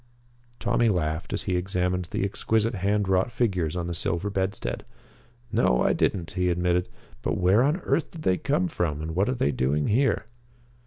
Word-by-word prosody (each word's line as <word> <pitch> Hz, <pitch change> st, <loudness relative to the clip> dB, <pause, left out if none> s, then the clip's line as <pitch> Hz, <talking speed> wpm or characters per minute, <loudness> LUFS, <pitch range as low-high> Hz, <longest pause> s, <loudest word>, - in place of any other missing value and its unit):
Tommy 120 Hz, -1 st, +2 dB
laughed 80 Hz, -4 st, -1 dB
at -, -, -1 dB
he 90 Hz, -, -1 dB
examined 90 Hz, 0 st, -1 dB
the 85 Hz, -, -3 dB
exquisite 110 Hz, +3 st, 0 dB
hand 100 Hz, +1 st, 0 dB
wrought 95 Hz, +4 st, +2 dB
figures 95 Hz, -10 st, 0 dB
on 90 Hz, -1 st, -2 dB
the 85 Hz, -, -3 dB
silver 85 Hz, +4 st, -1 dB
bedstead. 95 Hz, -10 st, -2 dB, 0.7 s
"No, 60 Hz, 0 st, +3 dB
I -, -, +3 dB
didn't," 85 Hz, -4 st, 0 dB
he 90 Hz, -1 st, 0 dB
admitted; 90 Hz, 0 st, +1 dB, 0.3 s
"but -, -, -1 dB
where 95 Hz, +5 st, +4 dB
on 150 Hz, +8 st, +1 dB
earth 155 Hz, -2 st, 0 dB
did 160 Hz, -2 st, -10 dB
they 90 Hz, -, +2 dB
come 150 Hz, +6 st, +1 dB
from, 80 Hz, -, -2 dB
and 80 Hz, 0 st, -4 dB
what 100 Hz, +6 st, +2 dB
are 130 Hz, -, 0 dB
they 70 Hz, -, +1 dB
doing 70 Hz, +3 st, 0 dB
here?" 115 Hz, -1 st, +2 dB
90 Hz, 180 wpm, -26 LUFS, 85-110 Hz, 0.7 s, where